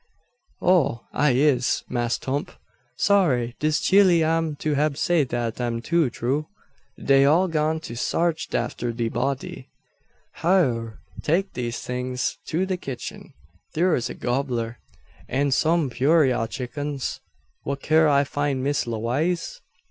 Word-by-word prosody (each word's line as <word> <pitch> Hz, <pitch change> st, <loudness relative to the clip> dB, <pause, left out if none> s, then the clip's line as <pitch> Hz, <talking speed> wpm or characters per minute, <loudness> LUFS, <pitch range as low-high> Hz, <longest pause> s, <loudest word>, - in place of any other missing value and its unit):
"Oh! 140 Hz, -10 st, +2 dB
I 145 Hz, -1 st, +3 dB
is, 130 Hz, -1 st, +2 dB
Mass' 120 Hz, -1 st, -1 dB
'Tump. 145 Hz, +7 st, -3 dB, 0.4 s
Sorry 135 Hz, -12 st, +2 dB
dis 155 Hz, 0 st, +1 dB
chile 185 Hz, -4 st, +5 dB
am 160 Hz, -1 st, 0 dB
to 150 Hz, +1 st, -2 dB
hab 145 Hz, 0 st, +1 dB
say 170 Hz, -2 st, +2 dB
dat 120 Hz, -1 st, -3 dB
am 120 Hz, -1 st, -1 dB
too 165 Hz, +3 st, +1 dB
troo. 135 Hz, +6 st, -2 dB, 0.5 s
Dey 135 Hz, 0 st, +4 dB
all 165 Hz, +7 st, +4 dB
gone 160 Hz, -1 st, 0 dB
to 115 Hz, -, -7 dB
sarch 165 Hz, +6 st, -1 dB
atter 120 Hz, 0 st, -2 dB
de 115 Hz, -1 st, -1 dB
body." 135 Hz, +2 st, -3 dB, 0.7 s
"Hyur! 125 Hz, -, +1 dB, 0.2 s
Take 190 Hz, +5 st, 0 dB
these 120 Hz, -2 st, -4 dB
things 125 Hz, 0 st, -3 dB
to 175 Hz, +4 st, 0 dB
the 185 Hz, -1 st, -2 dB
kitchen. 135 Hz, -8 st, -7 dB, 0.4 s
Thur's 165 Hz, -7 st, +1 dB
a -, -, -6 dB
gobbler, 120 Hz, -2 st, -2 dB, 0.5 s
an 140 Hz, +2 st, +1 dB
some 155 Hz, 0 st, +2 dB
purayra 130 Hz, -3 st, +2 dB
chickens. 140 Hz, +2 st, -4 dB, 0.4 s
Whar 140 Hz, -, -2 dB
kin 155 Hz, +3 st, +3 dB
I 140 Hz, -1 st, +4 dB
find 140 Hz, -2 st, -2 dB
Miss 145 Hz, -2 st, 0 dB
Lewaze?" 145 Hz, -, -2 dB
140 Hz, 135 wpm, -24 LUFS, 125-160 Hz, 0.7 s, chile